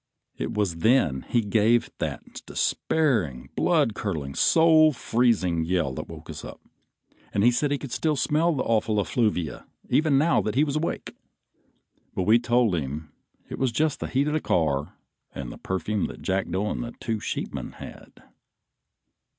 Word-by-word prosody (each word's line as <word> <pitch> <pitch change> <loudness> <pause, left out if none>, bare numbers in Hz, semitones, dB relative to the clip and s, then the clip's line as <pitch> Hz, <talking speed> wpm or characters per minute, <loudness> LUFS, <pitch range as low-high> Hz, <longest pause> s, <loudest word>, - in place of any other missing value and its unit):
It - - -4
was 100 -6 0
then 85 - +2
he 120 - +3
gave 110 +2 +2
that - - -5
despairing, 90 - 0
blood 115 - +2
curdling, 80 -11 -4
soul 160 - +5
freezing 110 -10 +1
yell 85 -5 0
that - - -6
woke 80 -1 -11
us - - -8
up, - - -9 0.7
and 100 - +1
he 120 - +6
said 145 +4 0
he 145 - 0
could 140 -2 -8
still 150 +5 0
smell 155 +5 +2
that 135 - -1
awful 110 -1 +1
effluvia 100 -3 -1 0.2
even 150 -3 +3
now 160 +4 +3
that 105 - -3
he 140 - +4
was 145 -2 -1
awake; 155 +2 -3 1.0
but 95 - 0
we 110 +5 +5
told 120 -3 +2
him 75 0 -4 0.4
it - - -7
was 130 -2 +1
just 155 +5 0
the - - -3
heat 135 +2 +1
of 150 - -1
the 155 - 0
car 75 -4 0 0.4
and 60 -3 -5
the - - -11
perfume 100 +2 -2
that - - -10
Jackdo 95 +1 -1
and - - -3
the 120 - -7
two 110 -1 -2
sheepmen - - -4
had. - - -12
110 Hz, 165 wpm, -25 LUFS, 85-135 Hz, 1.0 s, he